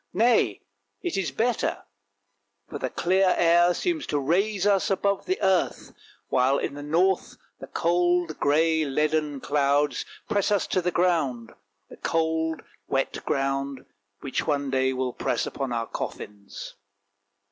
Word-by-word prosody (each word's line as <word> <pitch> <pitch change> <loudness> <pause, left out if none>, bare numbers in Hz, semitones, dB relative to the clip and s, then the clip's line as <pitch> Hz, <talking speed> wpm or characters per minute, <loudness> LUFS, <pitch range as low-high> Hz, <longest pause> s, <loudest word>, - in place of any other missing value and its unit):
Nay, 230 +5 +3 0.4
it 350 - -2
is 190 -6 0
better, 230 - -1 0.8
for - - -6
the 130 - -2
clear 185 +6 +2
air 175 +1 +5
seems 340 -4 -1
to 145 - 0
raise 190 +8 +1
us 200 -2 +3
above 200 0 0
the 370 - +1
earth, 190 -2 +1 0.4
while 130 +2 +3
in - - -2
the 145 - -7
north 175 +6 +1 0.2
the - - -8
cold, 175 -1 +1
grey, 160 +2 +3
leaden 150 0 0
clouds 145 0 +1 0.2
press 205 -3 +1
us 205 - +2
to 185 - 0
the 180 - 0
ground 160 -10 0 0.2
— - - -49
the - - -11
cold, 160 0 -1 0.2
wet 135 0 -1
ground 135 -1 -1 0.4
which 135 - -3
one 140 -1 0
day 130 0 +2
will 130 -1 -2
press - - -1
upon 135 -2 -4
our 115 -1 -1
coffins. 100 -2 -7
160 Hz, 145 wpm, -26 LUFS, 135-185 Hz, 0.8 s, air